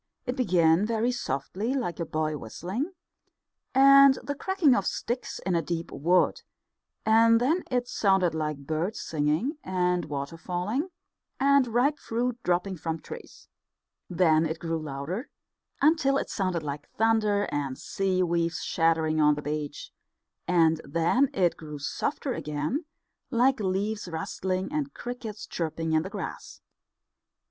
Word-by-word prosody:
It 250 -1 -2
began 175 - +3
very 230 +2 +1
softly, 205 - -2
like 230 -11 -2
a 170 - -2
boy 155 0 -1
whistling, 185 - -4 0.8
and 275 0 +8
the 285 - -2
cracking 335 -1 +2
of 200 -5 +1
sticks 240 +2 -3
in 185 - +1
a 170 - +2
deep 165 +1 -4
wood, 175 +5 +2 0.6
and 230 +1 +5
then 315 +9 +1
it 245 -1 0
sounded 190 -7 +2
like 150 -3 -3
birds 160 +8 -2
singing, 160 - -1
and 180 -2 0
water 145 +2 -5
falling, 185 - -2 0.5
and 280 -1 +4
ripe 250 +6 +1
fruit 240 +1 -2
dropping 180 +1 0
from 160 0 -3
trees. - - -11 0.6
Then 165 -3 +3
it 160 +1 -3
grew 165 0 -2
louder, 155 - -5 0.5
until 290 -3 +4
it - - -3
sounded 185 -5 -1
like 145 0 -6
thunder 215 -2 +3
and 140 -3 -2
sea 190 -1 0
waves 170 -1 0
shattering 160 -1 +2
on 150 0 +5
the 150 - -6
beach; 150 -1 -4 0.6
and 165 -2 +3
then 170 - +2
it 180 -10 +1
grew 150 -2 -8
softer 255 - -2
again, 150 - -3 0.4
like 260 +1 +3
leaves 205 +1 -1
rustling, 185 - -3
and 290 -2 -2
crickets 235 -4 -6
chirping 165 -1 -3
in 160 0 +3
the 185 - -6
grass. - - -7
185 Hz, 140 wpm, -27 LUFS, 160-245 Hz, 0.8 s, and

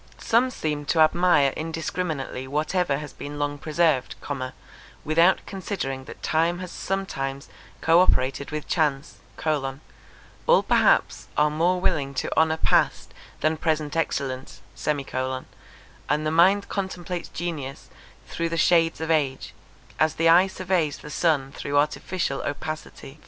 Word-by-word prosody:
Some 240 +3 +2
seem 150 -10 -3
to 160 - +1
admire 155 -3 +4
indiscriminately 160 -4 -3
whatever 150 +2 0
has 150 0 -8
been 145 +1 -7
long 145 0 -2
preserved, 155 -3 +1 0.9
without 165 +4 +4
considering 180 -9 -4
that - - -11
time 165 +2 +1
has 180 -1 -7
sometimes 140 -8 -3 0.3
co 165 +1 +5
operated 135 -4 +1
with 155 -1 -5
chance: 150 -3 0 1.3
all - - +5
perhaps - - +2
are 150 0 +4
more 175 +4 +2
willing 145 -7 0
to 130 - -2
honour 160 0 +3
past - - +1 0.3
than 155 0 +1
present 155 -2 -1
excellence; 135 -5 -3 0.2
and 135 +1 -4
the 155 - +1
mind 190 +5 +4
contemplates 185 -3 -4
genius 155 -6 -5 0.4
through 165 0 -2
the 165 - -2
shades 165 0 +3
of 160 0 -1
age, 140 -4 0 0.5
as 155 0 +2
the 165 0 +3
eye 180 +3 +7
surveys 185 -5 -1
the 150 - -10
sun 150 -4 +1
through 145 0 -2
artificial 150 0 0
opacity. 150 0 -6
155 Hz, 130 wpm, -25 LUFS, 145-175 Hz, 1.3 s, eye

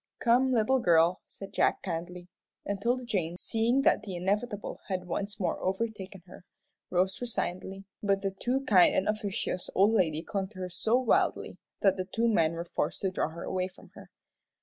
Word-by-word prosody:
"Come, 250 +2 +3
little 250 +2 +3
girl," 170 -3 +4
said 195 - -10
Jack, - - +2
kindly, 175 0 -5 0.4
and 200 -1 -3
'Tilda 245 +2 0
Jane, 175 -6 -1
seeing 230 +7 +1
that - - +4
the 200 -4 -6
inevitable 205 +4 -2
had 185 -2 -3
once 200 +4 -4
more 185 - -1
overtaken 195 -2 -3
her, 180 - -14 0.5
rose 185 +3 0
resignedly, 195 -4 -3 0.2
but 200 -1 +1
the 195 - 0
too 245 +7 -1
kind 195 -9 +5
and 190 - +1
officious 205 -3 -2
old 200 +3 +5
lady 165 -6 +1
clung 195 +1 -2
to 200 0 -17
her 185 -1 -4
so 220 +6 +1
wildly 255 -2 +1 0.2
that 195 -2 +4
the 185 - -2
two 225 +5 0
men 165 -8 +3
were 170 +1 -4
forced - - -2
to 190 - 0
draw 185 - -1
her 170 +1 -8
away 185 -1 -1
from 185 - -17
her. - - -13
195 Hz, 185 wpm, -29 LUFS, 180-220 Hz, 0.5 s, kind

